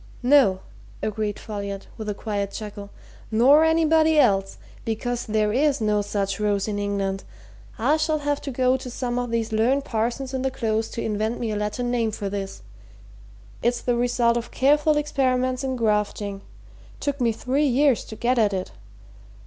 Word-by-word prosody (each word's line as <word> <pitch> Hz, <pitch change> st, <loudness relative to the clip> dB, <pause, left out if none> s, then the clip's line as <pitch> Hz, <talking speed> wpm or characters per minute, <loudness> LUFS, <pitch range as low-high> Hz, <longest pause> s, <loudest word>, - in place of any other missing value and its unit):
"No!" 245 Hz, -8 st, +5 dB, 0.4 s
agreed 210 Hz, -1 st, -2 dB
Folliot, 200 Hz, -2 st, -6 dB
with 215 Hz, -1 st, -5 dB
a 205 Hz, -, -2 dB
quiet 200 Hz, -2 st, -3 dB
chuckle. 205 Hz, -1 st, -7 dB, 0.4 s
"Nor 265 Hz, +8 st, +6 dB
anybody 320 Hz, -1 st, +4 dB
else 195 Hz, -8 st, +3 dB, 0.3 s
because 240 Hz, +1 st, -3 dB
there's 220 Hz, +7 st, +2 dB
no 210 Hz, -1 st, +1 dB
such 200 Hz, -1 st, -2 dB
rose 205 Hz, -1 st, 0 dB
in 205 Hz, -1 st, -2 dB
England. 200 Hz, -1 st, -2 dB, 0.5 s
I 265 Hz, +7 st, +2 dB
shall 310 Hz, 0 st, +1 dB
have 290 Hz, -1 st, -1 dB
to -, -, -5 dB
go 255 Hz, 0 st, +2 dB
to 255 Hz, -, -8 dB
some 245 Hz, 0 st, -2 dB
of 245 Hz, -1 st, -3 dB
these 230 Hz, -1 st, -1 dB
learned 250 Hz, +6 st, +2 dB
parsons 240 Hz, +4 st, -2 dB
in 260 Hz, -, -1 dB
the 265 Hz, -, +1 dB
Close 225 Hz, -3 st, -1 dB
to -, -, -4 dB
invent 220 Hz, +2 st, -1 dB
me 230 Hz, -2 st, -2 dB
a -, -, -2 dB
Latin 210 Hz, +4 st, -2 dB
name 235 Hz, -2 st, +1 dB
for 205 Hz, -2 st, -4 dB
this 195 Hz, -1 st, -5 dB, 1.0 s
it's 240 Hz, +1 st, +1 dB
the 245 Hz, -, 0 dB
result 240 Hz, -1 st, +2 dB
of 235 Hz, 0 st, -4 dB
careful 295 Hz, +3 st, +3 dB
experiments 255 Hz, -3 st, 0 dB
in 260 Hz, -1 st, -1 dB
grafting 210 Hz, -3 st, -1 dB, 0.6 s
took 285 Hz, -2 st, -2 dB
me 235 Hz, -1 st, +3 dB
three 265 Hz, +6 st, 0 dB
years 270 Hz, -1 st, +3 dB
to 220 Hz, -, -8 dB
get 240 Hz, +3 st, +1 dB
at 210 Hz, -3 st, +3 dB
it. 185 Hz, -1 st, -3 dB
235 Hz, 170 wpm, -24 LUFS, 210-260 Hz, 1.0 s, Nor